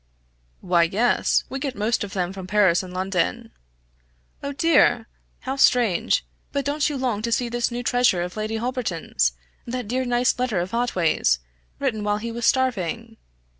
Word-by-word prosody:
"Why 175 -2 +3
yes! 205 +9 +2
we 270 - -5
get 270 -2 -3
most 220 +1 0
of 200 - -7
them 180 -1 -2
from 190 -2 -8
Paris 190 -3 +3
and 185 -1 -9
London." 190 +5 -1 0.9
"Oh 280 - -4
dear! 285 -6 +3 0.3
how 265 +1 -4
strange 240 -9 +3 0.3
but 280 -1 -2
don't 290 +1 +1
you 290 - -3
long 245 -5 -1
to 235 +1 -2
see 240 +1 +1
this 240 0 0
new 240 0 -4
treasure 245 -8 +2
of 180 - -6
Lady 215 +1 -3
Holberton's 190 - -1 0.3
that 245 -2 -4
dear 255 +4 0
nice 245 0 +1
letter 245 -7 0
of 180 +4 -4
Otway's, 180 - +1 0.4
written 235 -7 -1
while 205 0 +1
he 230 +2 -5
was 235 0 -1
starving?" 230 -3 0
230 Hz, 170 wpm, -23 LUFS, 190-250 Hz, 0.9 s, Why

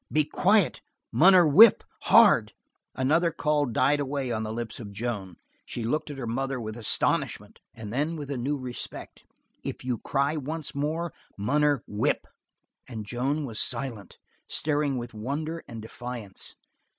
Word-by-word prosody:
"Be 155 -1 +3
quiet, 200 +4 +2 0.3
Munner 180 0 +6
whip 205 +10 +8 0.2
hard!" 190 - +6 0.4
Another 155 +6 +2
call 150 -3 0
died 140 +5 +2
away 140 -2 -2
on 110 -1 -1
the 110 -1 -4
lips 115 0 -5
of 105 -4 -8
Joan. 100 -4 -4 0.3
She 120 - -5
looked 150 +7 -1
at 145 - -7
her 130 - -4
mother 135 +3 -2
with 110 -2 -5
astonishment 115 -3 -1 0.2
and 110 -1 -7
then 150 +6 0
with 145 -3 -6
a - - -1
new 140 +4 -1
respect. 125 -2 -6 0.4
"If - - -6
you 125 -3 -1
cry 140 +2 0
once 155 +2 -4
more, 155 +3 -2 0.2
munner 145 +5 +1
whip!" 105 - 0 0.6
And 110 -4 -6
Joan 135 +7 -1
was 115 -4 -4
silent, 115 -8 -2 0.3
staring 145 -3 0
with 120 -1 -6
wonder 150 +9 -4
and 115 -2 -8
defiance. 120 -3 -7
135 Hz, 150 wpm, -27 LUFS, 115-150 Hz, 0.6 s, whip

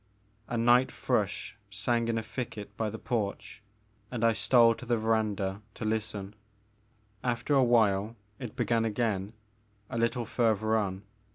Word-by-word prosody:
A 120 - -2
night 120 +2 +4
thrush - - -1
sang 115 +4 0
in 115 -1 0
a 115 - -2
thicket 110 -2 -6
by 110 -1 -1
the 110 - -6
porch 105 -3 -3 0.5
and 120 -2 -3
I 115 -1 +5
stole 115 0 +5
to 125 - -10
the 120 -1 +2
verandah 105 -3 0
to - - -5
listen. 105 -2 -2 0.9
After 120 +3 0
a 135 -2 +5
while 110 -3 +3 0.2
it 120 -5 -7
began 115 -1 +1
again, 105 -2 -1 0.6
a 115 - -2
little 115 +1 0
further 110 -1 +1
on. 100 -3 -1
110 Hz, 150 wpm, -29 LUFS, 105-120 Hz, 0.9 s, I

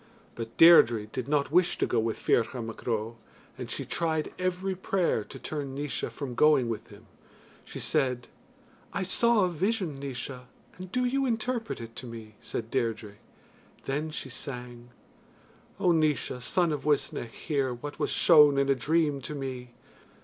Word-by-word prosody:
But 115 0 -7
Deirdre 120 -10 +7
did 125 +3 -5
not 145 -1 +1
wish 175 +2 +3
to - - +1
go 120 - +1
with 110 0 -1
Ferchar 120 +1 +1
Mac 115 +2 -9
Ro, 115 0 -2 0.4
and - - -7
she - - -4
tried 160 -2 -1
every 185 +1 -1
prayer 185 - 0
to - - -10
turn 140 -3 -5
Naois 145 +1 -3
from 140 -4 -6
going 140 -3 +4
with 115 - -4
him - - -15 0.6
she - - -8
said: 130 -5 0 0.7
"I 195 - -1
saw 220 +2 +3
a - - 0
vision, 180 -3 -1
Naois, 130 -1 -6 0.3
and 185 0 -9
do 250 +3 +1
you 270 +2 +1
interpret 230 0 -2
it 115 0 -9
to 125 - -7
me," 110 -2 -9
said 115 -1 -5
Deirdre 110 -5 -2 0.7
then 150 +3 -2
she 140 -3 -6
sang: 125 -2 -7 0.9
O 180 - +3
Naois, 150 -6 +1
son 170 +6 +1
of 145 -3 -3
Uisnech, 145 -5 0
hear 140 -5 -1
What 135 +5 -7
was - - 0
shown 150 -4 +6
in 140 0 +2
a - - +6
dream 145 +2 +1
to 150 - -6
me. 130 -3 -6
140 Hz, 165 wpm, -28 LUFS, 120-170 Hz, 0.9 s, Deirdre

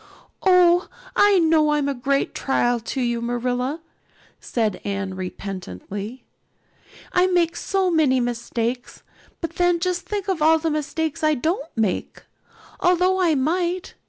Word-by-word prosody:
"Oh, 360 -1 +5 0.3
I 410 -1 +5
know 315 -3 +3
I'm 295 -1 +1
a 280 - 0
great 275 +2 -1
trial 245 -3 +1
to 245 +4 -4
you, 240 -1 -1
Marilla," 250 +5 -2 0.6
said 220 -5 -2
Anne 195 -1 -3
repentantly. 195 - -7 0.9
"I 360 0 +4
make 345 -2 +1
so 380 0 0
many 295 -6 +3
mistakes. 240 0 -3 0.4
But 335 - -5
then 355 -1 +3
just 360 +1 -2
think 410 -1 -3
of 375 -5 -1
all 320 +1 +5
the 320 0 -1
mistakes 305 +1 -2
I 310 0 +3
don't 320 +3 -2
make, 220 -5 -2 0.6
although 365 +1 +3
I 335 -4 +3
might. 345 +6 -1
300 Hz, 135 wpm, -22 LUFS, 240-350 Hz, 0.9 s, Oh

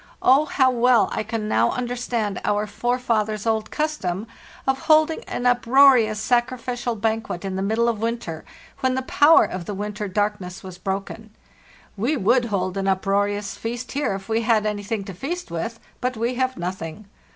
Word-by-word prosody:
Oh, 275 +4 +5
how 260 -3 +3
well 245 -1 +4
I - - -1
can 220 0 -3
now - - +3
understand 240 -5 -2
our 210 0 +1
forefathers' 220 -2 -1
old 220 -1 0
cus 305 0 -1
tom 185 0 -3 0.4
of 265 0 +1
holding 315 +1 +4
an 245 - -4
uproarious 245 -2 +5
sacrificial 245 0 -1
banquet 220 -4 -2
in 190 -1 -3
the 190 - -2
middle 220 +4 +1
of 225 -3 -1
winter, 230 -9 -3 0.4
when 260 -1 +1
the 260 - -1
power 295 +5 +5
of 185 -2 -5
the 205 - -4
winter 210 +1 -4
dark 205 +1 0
ness 180 0 -8
was 185 -1 -9
broken. 200 +3 -5 0.6
We 245 +10 0
would 240 +3 +3
hold 190 -3 -2
an 195 0 -1
uproarious 200 +1 0
feast 240 +2 -5
here 280 -8 -1
if 195 0 -8
we 225 0 +1
had 220 -2 +2
anything 205 0 -2
to 195 - -8
feast 325 - -5
with; 225 +8 -4 0.2
but 250 -1 -2
we 235 +3 0
have 255 +1 -1
nothing. 180 +2 -5
220 Hz, 175 wpm, -23 LUFS, 200-250 Hz, 0.6 s, Oh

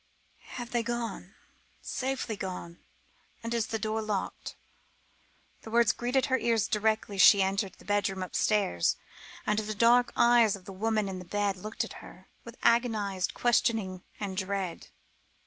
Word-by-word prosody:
"Have 240 -1 -6
they 240 - +1
gone 235 0 -4 0.4
safely 260 -4 -3
gone? 180 -3 -6 0.6
And 230 +1 -3
is 230 -2 0
the 225 - -2
door 220 0 -2
locked?" 210 -3 -4 1.1
The - - -10
words 230 -1 +4
greeted 250 +3 0
her 260 -2 +1
ears 225 -2 +1
directly 215 -1 0
she 195 +1 +8
entered 195 0 -1
the - - -18
bedroom 200 -2 0
upstairs, 185 - +1 0.5
and 210 0 +1
the 215 0 -4
dark 240 +3 +4
eyes 235 -3 +5
of 190 -2 -14
the 195 - -8
woman 215 +1 0
in 190 -1 -5
the - - -8
bed 205 +2 -1
looked 215 +4 -4
at 230 - -7
her, 185 - -14
with 235 0 -11
agonised 215 -6 +1
questioning 220 -6 +1 0.2
and 200 -2 -4
dread. 190 -2 -3
215 Hz, 150 wpm, -29 LUFS, 195-235 Hz, 1.1 s, she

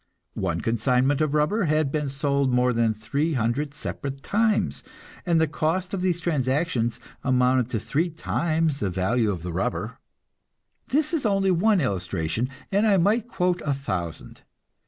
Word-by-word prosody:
One 85 -3 -1
consignment 125 +5 +1
of 155 -1 +1
rubber 185 +8 +2
had 155 -2 +1
been 150 -2 -1
sold 140 -1 0
more 125 0 +3
than 115 -1 +1
three 140 +9 -1
hundred 135 +4 -1
separate 140 -2 -5
times, 220 0 +1 0.5
and 170 -2 +3
the 160 - +4
cost 170 +5 -1
of 190 - -1
these 180 -2 +1
transactions 135 -6 0 0.2
amounted 125 -1 +2
to 115 - -1
three 160 - 0
times 160 -2 -1
the 100 - -1
value 105 +5 +1
of 90 -5 -3
the 90 -1 -4
rubber. 95 +3 -2 0.9
This 305 +4 +1
is 320 - 0
only 195 -3 +2
one 195 +3 +3
illustration, 95 - -1 0.2
and 205 +3 +3
I 200 -2 +4
might 210 +6 +2
quote 180 -5 0
a 145 -2 0
thousand. 95 - -5
140 Hz, 155 wpm, -25 LUFS, 120-175 Hz, 0.9 s, the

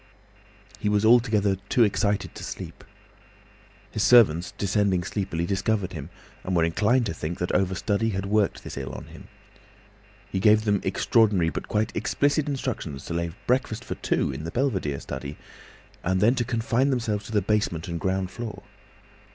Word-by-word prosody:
He 105 - 0
was 105 +1 +2
altogether 110 -4 +4
too 120 - +4
excited 100 -1 0
to - - -9
sleep. - - -7 1.1
His 110 - -2
servants, 95 -8 +5
descending 100 -2 +1
sleepily, 95 -3 -2
discovered 100 0 -1
him, 75 -1 -7 0.3
and 95 - -2
were 85 - +3
inclined 110 +9 +2
to 100 - -2
think 80 +3 -4
that 90 - -2
over 95 0 +1
study 105 +3 0
had 95 -2 -2
worked 105 0 +1
this - - -8
ill 65 -1 -5
on - - -7
him. - - -13 1.0
He 95 - -2
gave 105 +2 +5
them 100 -2 +2
extraordinary 100 -7 +3
but - - -5
quite 110 +1 -1
explicit 145 +1 +1
instructions 115 - -4
to - - -4
lay 85 0 -1 0.2
breakfast 120 -2 0
for - - -3
two - - 0
in - - -6
the 80 - -4
belvedere 95 - -1
study—and 85 +5 -6
then 110 +5 +5
to 125 -2 0
confine 120 +2 +1
themselves 115 -6 -1
to - - -9
the 105 -3 +1
basement 100 -5 0
and 85 -1 -3
ground 95 0 -1
floor. 115 -2 -7
100 Hz, 165 wpm, -25 LUFS, 90-115 Hz, 1.1 s, servants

